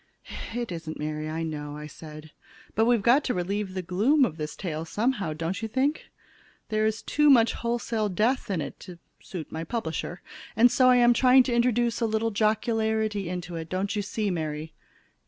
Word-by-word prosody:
"It 240 -4 -3
isn't, 165 -2 -6
Mary, 155 0 -4
I 160 +1 -3
know," 150 -1 -5
said 155 0 -11
I. - - -25
"But 220 - +3
we've 235 -3 +3
got 260 +6 +5
to 250 - 0
relieve 190 +2 -2
the 185 - -3
gloom 225 - +3
of 160 -8 -5
this 150 -1 -5
tale 160 -5 -4
someway, 205 -2 -1
don't 165 +6 -3
you 225 - -2
think? 265 +7 -1 0.6
There 215 0 +1
is 220 0 -2
too 300 0 +3
much 235 -4 +6
wholesale 235 -2 -1
death 225 +8 0
in 185 -5 -1
it - - -7
to 180 -2 -10 0.2
suit 175 -5 -7
my 160 +1 -4
publisher! 175 -4 -4 0.3
And 235 +2 +6
so 255 -1 +5
I 250 - +6
am 240 -1 +6
trying 255 +2 +6
to 250 - -2
introduce 240 -1 +1
a 230 - +2
little 220 +1 0
jocularity 220 -2 0
into 175 -1 -5
it, 160 0 -6
don't 195 +4 -2
you 210 - 0
see, 205 0 -2
Mary?" 155 -2 -4
210 Hz, 190 wpm, -26 LUFS, 165-235 Hz, 0.6 s, much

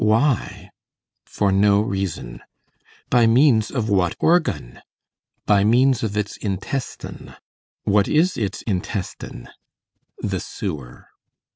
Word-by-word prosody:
Why? 115 +4 +1 0.6
For 100 -1 0
no 100 +1 +4
reason. 95 - -3 0.7
By 120 -2 +5
means 115 -2 +4
of 120 -5 -2
what 95 -5 +1
organ? 160 - +1 0.6
By 100 -1 +4
means 125 +3 +3
of 105 -2 -2
its 105 0 -2
intestine. 105 +6 -5 0.5
What 100 0 +3
is 170 +4 +2
its 100 -4 -3
intestine? 95 -1 -4 0.7
The - - -2
sewer. 70 -10 -7
105 Hz, 105 wpm, -22 LUFS, 95-120 Hz, 0.7 s, By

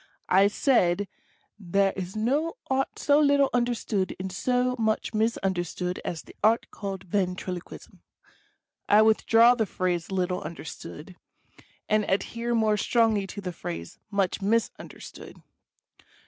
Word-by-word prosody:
I 195 +2 +6
said, 205 -4 +2 0.5
"there 195 +1 +1
is 190 0 -6
no 285 - 0
Art 265 +1 0
so 290 0 +3
little 285 -2 +4
understood 235 -5 -1
and 190 0 -4
so 250 +5 0
much 220 0 0
misunder 205 -5 0
stood 180 +1 -4
as 165 - -4
the - - -16
Art 225 +2 +3
called 195 -2 -6
Ventriloquism." 180 -1 -4 0.9
I 210 +1 +7
withdraw 225 +2 +5
the 225 -4 -1
phrase 180 -2 -2
"little 180 -1 -1
understood,* 165 +1 -9 0.3
* - - -27
and 215 0 +2
adhere 235 +4 -1
more 215 -2 +2
strongly 220 -2 +2
to 205 - -7
the 180 -2 -5
phrase 85 - -7
"much 200 -1 0
misunderstood." 225 +3 -3
205 Hz, 130 wpm, -26 LUFS, 185-230 Hz, 0.9 s, I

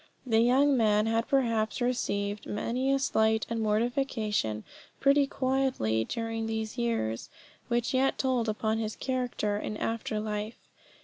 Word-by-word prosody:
The 225 -3 +3
young 265 +4 +4
man 215 -3 +3
had 225 +1 0
perhaps 230 -5 +1
received 205 -5 -1
many 250 +5 -1
a 275 - +3
slight 220 -5 +2
and 230 - -1
mortification 215 - 0 0.4
pretty 280 0 +4
quietly 260 - 0
during 225 - -3
these 220 0 -3
years, 230 - -1 0.4
which 240 0 0
yet 265 +1 +2
told 250 -4 +1
upon 220 +1 0
his 220 -1 -3
character 245 -5 -1
in 215 - -4
after 225 0 -2
life. 210 +1 -4
225 Hz, 135 wpm, -29 LUFS, 215-255 Hz, 0.4 s, young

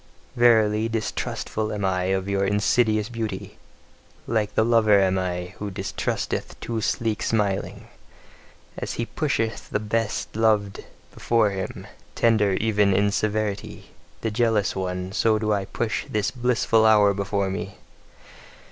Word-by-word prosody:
Verily, 110 -2 +4
distrustful 110 -1 -3
am 105 -2 -2
I 90 -1 0
of 95 0 -1
your 100 0 0
insidious 105 +2 +2
beauty! 110 -5 -5 0.7
Like 110 -3 -1
the 110 - +3
lover 110 -3 +4
am 95 -1 +2
I, 90 0 -3
who 105 - -4
distrusteth 95 0 -3
too 115 -1 -3
sleek 110 -2 -1
smiling. 105 -4 -1 0.9
As - - -4
he 115 - -2
pusheth 115 -5 -2
the - - -1
best 110 0 -2
beloved 105 -3 +1 0.3
before 115 -3 +2
him 95 -1 -5 0.3
tender 110 -4 +3
even 105 -1 +2
in 100 +1 +2
severity, 105 -1 -2 0.3
the 110 - -1
jealous 110 -2 +1
one, 90 -1 -3
so 110 +1 +2
do 110 0 0
I 100 -1 -1
push 110 +3 -3
this 105 -1 0
blissful 120 -3 +2
hour 105 -2 +5
before 100 -1 -1
me. 95 - -5
105 Hz, 135 wpm, -24 LUFS, 100-110 Hz, 0.9 s, hour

